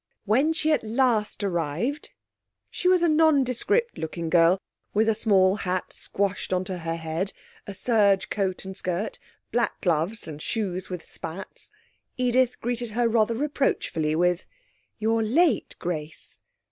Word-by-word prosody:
When 260 Hz, +10 st, +3 dB
she 315 Hz, -1 st, +1 dB
at 300 Hz, -, +2 dB
last 225 Hz, -2 st, +1 dB
arrived 180 Hz, -, -2 dB, 0.6 s
she -, -, -1 dB
was 365 Hz, -1 st, +4 dB
a -, -, +5 dB
nondescript 315 Hz, -, +2 dB
looking 160 Hz, 0 st, -4 dB
girl, 170 Hz, +1 st, +5 dB, 0.4 s
with 220 Hz, +2 st, +3 dB
a 225 Hz, -, +4 dB
small 200 Hz, -3 st, +3 dB
hat 185 Hz, -2 st, -2 dB
squashed 200 Hz, -1 st, -1 dB
on 185 Hz, 0 st, 0 dB
her 185 Hz, 0 st, -4 dB
head, 165 Hz, +3 st, -3 dB, 0.3 s
a 200 Hz, -, -6 dB
serge 200 Hz, -2 st, +2 dB
coat 190 Hz, -2 st, -1 dB
and 190 Hz, 0 st, -6 dB
skirt, 185 Hz, +4 st, -3 dB, 0.3 s
black 235 Hz, 0 st, 0 dB
gloves 175 Hz, +5 st, 0 dB
and 150 Hz, -1 st, -7 dB
shoes 190 Hz, -4 st, -3 dB
with 180 Hz, -3 st, -6 dB
spats 165 Hz, +4 st, -8 dB, 0.5 s
Edith 250 Hz, 0 st, +2 dB
greeted 240 Hz, 0 st, -2 dB
her 240 Hz, -1 st, +3 dB
rather 230 Hz, 0 st, +2 dB
reproachfully 250 Hz, -, 0 dB
with: 180 Hz, +1 st, +1 dB, 0.5 s
'You're 225 Hz, +1 st, +1 dB
late, 290 Hz, +10 st, +2 dB
Grace.' 155 Hz, -3 st, -4 dB
205 Hz, 140 wpm, -26 LUFS, 180-245 Hz, 0.6 s, a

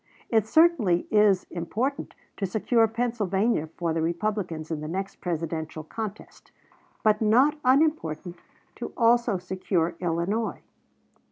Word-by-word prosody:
It 220 Hz, -2 st, +2 dB
certainly 240 Hz, -, +4 dB
is 210 Hz, -3 st, +4 dB
important 230 Hz, -, -3 dB, 0.2 s
to 195 Hz, -, -1 dB
secure 225 Hz, +4 st, +2 dB
Pennsylvania 220 Hz, -6 st, 0 dB
for 170 Hz, -2 st, -1 dB
the 165 Hz, -, -1 dB
Republicans 170 Hz, -2 st, -2 dB
in 155 Hz, -2 st, -3 dB
the 155 Hz, -, -5 dB
next 190 Hz, +4 st, -4 dB
Presidential 160 Hz, -2 st, -3 dB
contest; 215 Hz, +5 st, -8 dB, 0.5 s
and 215 Hz, 0 st, +3 dB
not 255 Hz, +8 st, +4 dB
unimportant 255 Hz, -, +1 dB, 0.4 s
to -, -, -6 dB
also 235 Hz, -3 st, +3 dB
secure 180 Hz, -2 st, -1 dB
Illinois. 180 Hz, +6 st, -1 dB
195 Hz, 115 wpm, -26 LUFS, 170-230 Hz, 0.5 s, certainly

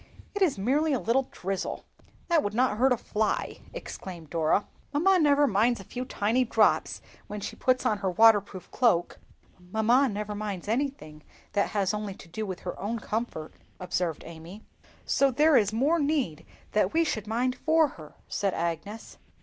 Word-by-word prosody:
"It 410 Hz, -, -4 dB
is 345 Hz, -, +3 dB
merely 285 Hz, +9 st, +1 dB
a 260 Hz, -, +1 dB
little 255 Hz, +3 st, +1 dB
drizzle, 195 Hz, +1 st, -4 dB, 0.4 s
that 335 Hz, -3 st, +3 dB
would 205 Hz, -3 st, -3 dB
not 245 Hz, -3 st, +2 dB
hurt 265 Hz, +1 st, +4 dB
a 250 Hz, -, +3 dB
fly!" 215 Hz, 0 st, -2 dB
exclaimed 180 Hz, -, -8 dB
Dora. 165 Hz, +4 st, +2 dB, 0.3 s
"Mamma 360 Hz, +6 st, +3 dB
never 290 Hz, -2 st, +4 dB
minds 230 Hz, 0 st, +2 dB
a -, -, -8 dB
few 250 Hz, +6 st, -6 dB
tiny 230 Hz, +3 st, +1 dB
drops 225 Hz, -3 st, +2 dB, 0.2 s
when 210 Hz, -, -5 dB
she -, -, -6 dB
puts 255 Hz, 0 st, +1 dB
on 210 Hz, -2 st, +1 dB
her 195 Hz, -2 st, -1 dB
waterproof 205 Hz, -2 st, +3 dB
cloak." 200 Hz, -9 st, +1 dB, 0.4 s
"Mamma 220 Hz, +9 st, +2 dB
never 210 Hz, 0 st, -4 dB
minds 205 Hz, -3 st, -5 dB
anything 230 Hz, -, -3 dB, 0.3 s
that 200 Hz, -, +1 dB
has 200 Hz, -2 st, 0 dB
only 210 Hz, -2 st, -4 dB
to -, -, -14 dB
do 210 Hz, +6 st, -5 dB
with 185 Hz, -2 st, -6 dB
her 180 Hz, -, -6 dB
own 220 Hz, +4 st, -2 dB
comfort," 215 Hz, -8 st, -4 dB, 0.3 s
observed 180 Hz, -3 st, -2 dB
Amy. 170 Hz, +5 st, -10 dB, 0.4 s
"So 275 Hz, -, +3 dB
there 300 Hz, +4 st, +4 dB
is 205 Hz, -4 st, +4 dB
more 280 Hz, +10 st, +2 dB
need 280 Hz, -, -1 dB, 0.2 s
that 210 Hz, -2 st, +1 dB
we 330 Hz, -, +4 dB
should 215 Hz, -9 st, -3 dB
mind 245 Hz, +3 st, 0 dB
for 315 Hz, -1 st, +3 dB
her," 155 Hz, -, -13 dB
said 195 Hz, -2 st, -1 dB
Agnes. 170 Hz, +6 st, -4 dB
215 Hz, 175 wpm, -27 LUFS, 195-260 Hz, 0.4 s, hurt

